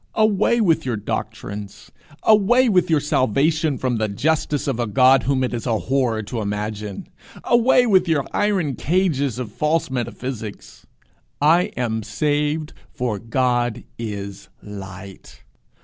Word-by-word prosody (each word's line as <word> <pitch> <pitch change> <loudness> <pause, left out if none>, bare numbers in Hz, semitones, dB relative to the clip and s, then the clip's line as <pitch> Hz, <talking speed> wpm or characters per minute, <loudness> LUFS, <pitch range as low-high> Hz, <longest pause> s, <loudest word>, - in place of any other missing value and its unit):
Away 215 +2 +3
with 170 -7 +2
your 125 -3 -2
doctrines! 100 -1 -6 0.3
Away 220 +4 +4
with 180 -3 +2
your 160 -2 +3
salvation 145 +2 +1
from 125 -2 -1
the 110 0 0
'justice' 145 +7 -1
of 130 -4 -1
a 120 - 0
God 130 +5 +5
whom 135 -1 0
it 125 - -2
is 120 +1 -4
a 115 -2 +1
horror 125 -3 0
to 110 +2 -4
imagine! 105 -1 -4 0.4
Away 245 +1 +4
with 190 -5 +3
your 155 -4 +1
iron 195 -9 +1
cages 145 - 0
of 125 -4 -5
false 150 +4 0
metaphysics! 120 -3 -6 0.5
I 165 +5 +4
am 110 -3 -1
saved 150 +6 -1 0.2
for 120 -5 -3
God 120 0 0 0.2
is 100 -3 -6
light! 95 -1 -10
130 Hz, 135 wpm, -21 LUFS, 110-160 Hz, 0.5 s, God